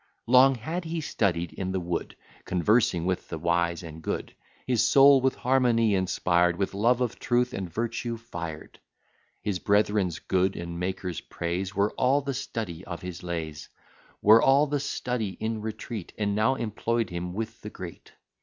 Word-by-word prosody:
Long 130 +2 +6
had 160 +10 -4
he 165 +1 -3
studied 90 - -1
in 95 -1 -3
the 95 - 0
wood, 85 -1 -3 0.3
Conversing 90 -1 +2
with 90 -1 -2
the 80 - -4
wise 85 +1 0
and 80 -1 -9
good: - - -4 0.3
His 125 -4 +2
soul 135 +3 +7
with 130 0 +2
harmony 120 -4 +2
inspired, 90 -2 +2
With 95 +2 -2
love 120 +5 +2
of 120 -3 -1
truth 125 +1 +1
and 95 -6 -4
virtue 115 +3 -3
fired: 85 -9 -8 0.6
His 100 -3 -1
brethren's 100 -4 +2
good 95 0 0
and 85 0 -5
Maker's 90 -1 -3
praise 90 +3 -4
Were 100 +2 +2
all 135 +3 +2
the 140 0 -3
study 110 -9 -5
of 85 -2 -7
his 90 -1 -6
lays; 80 -4 -5 0.5
Were 110 +2 +8
all 135 +2 +5
his 145 -1 -1
study 120 -8 -3
in 110 0 -2
retreat, 110 -2 -6
And 100 -1 0
now 110 +6 +2
employ'd 115 -2 -1
him 90 +1 -4
with 115 +1 -5
the 105 - -6
great. 90 -4 -10
105 Hz, 165 wpm, -27 LUFS, 90-120 Hz, 0.6 s, Were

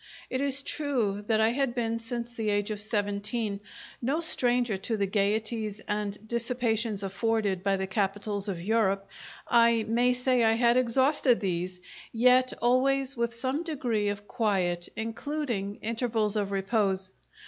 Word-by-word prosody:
It 260 - -1
is 280 0 +2
true 240 -11 -1
that 220 -1 +2
I 220 0 +4
had 260 0 -1
been, 230 -1 -1
since 235 0 -3
the 225 -3 -2
age 205 +1 0
of 210 -1 -3
seventeen, 205 0 -1 0.4
no 270 +6 0
stranger 245 -8 +3
to 220 +4 -2
the 200 - +1
gaieties 215 +2 -1
and 210 0 -3
dissipations 230 -3 -1
afforded 200 -1 0
by 195 0 +1
the 190 - -2
capitals 200 +1 -2
of 185 -3 -3
Europe; 195 0 +1 0.4
I 235 -1 +4
may 240 +3 +3
say 250 -1 +2
I 225 0 +4
had 235 +1 +3
exhausted 255 +1 +3
these, 180 -2 -3 0.3
yet 255 +2 +4
always 270 +2 +2
with 235 -1 -1
some 260 +5 -1
degree 250 -11 -1
of 205 0 -5
quiet, 190 -7 0
including 225 -2 -3
intervals 225 -2 -1
of 205 -2 0
repose. 195 -1 0
225 Hz, 150 wpm, -28 LUFS, 200-245 Hz, 0.4 s, I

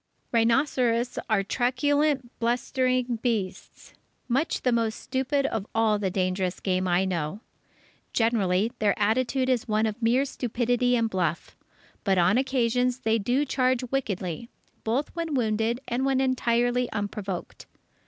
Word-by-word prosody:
Rhinoceros 240 0 +2
are 210 -3 +2
truculent, 265 +3 +1
blustering 245 0 0
beasts, 220 -7 -3 0.3
much 270 +6 0
the 250 - +3
most 230 -2 +1
stupid 270 +2 -1
of 225 -6 -2
all 220 -2 +3
the 195 -2 0
dangerous 185 0 -1
game 185 -1 0
I 180 +1 +2
know. 180 +2 -3 0.7
Generally 220 -3 +1
their 205 -2 +2
attitude 250 +5 +1
is 255 -3 +1
one 215 0 +1
of 220 +2 -3
mere 245 +4 +3
stupidity 245 -1 0
and 230 -1 +2
bluff. 175 -5 -2 0.5
But 195 -2 +2
on 180 +7 +4
occasions 250 -1 +1
they 225 0 +2
do 245 +8 +1
charge 255 -2 +1
wickedly, 215 -5 -3 0.3
both 255 +9 -1
when 330 -3 -2
wounded 225 0 0
and 245 +2 -1
when 270 -1 +2
entirely 245 -1 +1
unprovoked. 205 -3 -5
235 Hz, 135 wpm, -26 LUFS, 210-255 Hz, 0.7 s, on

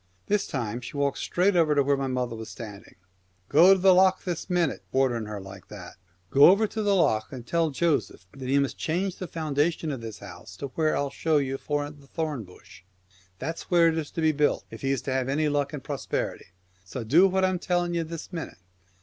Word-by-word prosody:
This 205 0 0
time 120 -3 -3
she 120 +4 -8
walks 140 -1 0
straight 185 +2 +1
over 160 -3 +3
to 140 - +4
where 140 +1 +2
my 135 -1 -2
mother 125 -2 -2
was 110 0 -8
standing. 105 -3 -10 0.3
" 90 +1 -40
Go 160 +4 +6
over 195 - +8
to - - -3
the 190 0 +7
Lough 185 +1 +5
this 175 0 -4
minute! 175 -5 0
" - - -40
— - - -40
ordering 120 -5 +1
her 105 -1 -5
like 95 -1 -11
that - - -10
— 85 +1 -38
" 90 - -40
Go 140 +1 +7
over 200 +4 +4
to 220 +1 -4
the 205 -1 +2
Lough, 110 - +3
and 125 -3 -8
tell 165 +4 +1
Joseph 150 - -1
that 130 -2 -6
he 140 - +3
must 140 -1 0
change 180 +3 -1
the 185 - -5
foundation 155 0 -1
of 135 -4 -5
this 110 -2 -7
house 90 -2 -11
to 140 - -5
where 155 +3 0
I'll 140 -1 -1
show 155 +3 +1
you 135 -2 0
foment 145 0 -3
the 140 - -19
thorn 150 -7 -3
bush. 90 -3 -16 0.6
That 160 - -4
is - - -7
where 170 -2 +5
it 160 - -1
is 150 - -5
to 165 - -3
be 160 0 +4
built, 150 0 +1
if - - -9
he 135 - -1
is 135 -3 0
to 135 - -2
have 130 -1 0
luck 145 0 0
and 145 -4 -7
prosperity, - - -3 0.4
so 115 +7 -6
do 165 - +5
what 190 0 +2
I'm 185 -1 0
telling 175 -1 0
ye 170 - 0
this 165 +2 -7
minute." 165 - -6
145 Hz, 245 wpm, -26 LUFS, 125-170 Hz, 0.6 s, over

